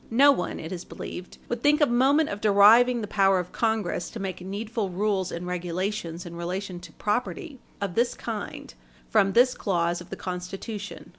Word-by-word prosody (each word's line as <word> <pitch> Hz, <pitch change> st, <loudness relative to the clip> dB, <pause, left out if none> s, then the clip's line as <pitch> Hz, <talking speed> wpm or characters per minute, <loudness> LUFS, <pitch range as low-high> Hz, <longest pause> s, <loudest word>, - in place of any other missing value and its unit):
No 275 Hz, +5 st, +6 dB
one, 180 Hz, -, -2 dB
it 160 Hz, -, -7 dB
is 180 Hz, -1 st, -5 dB
believed, 180 Hz, 0 st, -8 dB
would 240 Hz, -1 st, -3 dB
think 295 Hz, +2 st, +4 dB
a 295 Hz, -, +6 dB
moment 275 Hz, +5 st, +3 dB
of 200 Hz, +1 st, -5 dB
deriving 220 Hz, +4 st, +6 dB
the 210 Hz, -, -4 dB
power 195 Hz, -1 st, +3 dB
of 180 Hz, 0 st, -3 dB
Congress 220 Hz, -6 st, -1 dB
to 230 Hz, -, -8 dB
make 190 Hz, -2 st, -4 dB
needful 205 Hz, +2 st, -3 dB
rules 190 Hz, 0 st, 0 dB
and 170 Hz, +1 st, -5 dB
regulations 180 Hz, 0 st, -3 dB
in 170 Hz, -1 st, -8 dB
relation 180 Hz, +2 st, -4 dB
to 170 Hz, -2 st, -12 dB
property 255 Hz, -, -3 dB, 0.2 s
of 200 Hz, -3 st, -3 dB
this 240 Hz, +4 st, +1 dB
kind -, -, -6 dB, 0.4 s
from 200 Hz, -3 st, +3 dB
this 250 Hz, +2 st, +5 dB
clause 175 Hz, -3 st, 0 dB
of 175 Hz, -, -12 dB
the -, -, -5 dB
Constitution. 195 Hz, +3 st, -6 dB
200 Hz, 180 wpm, -26 LUFS, 180-230 Hz, 0.4 s, No